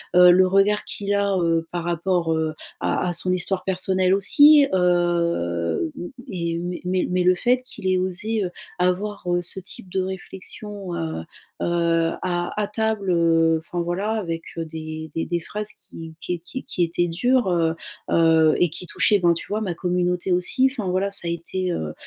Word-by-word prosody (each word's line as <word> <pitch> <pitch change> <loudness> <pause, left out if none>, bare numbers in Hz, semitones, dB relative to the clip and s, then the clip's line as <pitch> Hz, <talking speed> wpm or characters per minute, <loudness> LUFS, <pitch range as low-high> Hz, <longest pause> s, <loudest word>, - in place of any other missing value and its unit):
heu, 180 0 +9
le 185 +1 +5
regard 195 +2 +3
qu'il 200 0 -2
a, 200 -1 +1
heu, 165 -1 +1
par 175 -1 -3
rapport, 175 0 0
heu, 160 -1 -1 0.3
à - - 0
à - - -2
son 180 +2 -1
histoire 185 +1 0
personnelle 185 0 +1
aussi, 290 +9 +6
heu, 170 - +1
m 175 - -5
m - - -7 0.2
et 170 -2 -2
mais 175 0 -4
mais 185 0 0
mais 180 0 +1
le 180 0 +4
fait 250 +6 +1
qu'il 195 -6 -7
ait 185 0 +3
osé, 195 +4 -2
heu, 180 - -4 0.3
avoir, 190 +3 0
heu, 175 0 +1
ce 175 +2 -4
type 190 +2 -7
de 190 - 0
réflexion, 190 +1 -6
heu 160 - -3 0.4
heu, 170 -1 +1
à 175 -1 -1
à 205 - -1
table, 220 -2 -1
heu, 165 -1 +3
enfin 170 +2 -4
voilà 185 +5 -2
avec, 165 -7 -3
heu, 165 - -2
des 155 0 -7
des 165 - -1
des 175 -1 -1
phrases 210 +5 -5
qui 165 -1 -10
qui 175 0 -3
qui 180 -2 -3
étaient 170 +1 0
dures, 240 +7 +1
heu 165 -2 +1 0.4
heu 160 -1 +4
et 175 - +3
qui 175 +3 -9
touchaient 185 +5 +2
ben, 175 -2 +4
tu 170 - -6
vois 215 +1 -2
ma 185 -5 -2
communauté 180 +1 -1
aussi 180 +9 +3
enfin 225 -8 -4
voilà 190 +2 0
ça 175 - +1
a 170 - 0
été, 180 +2 -3
heu 80 - -3
180 Hz, 190 wpm, -23 LUFS, 170-195 Hz, 0.4 s, heu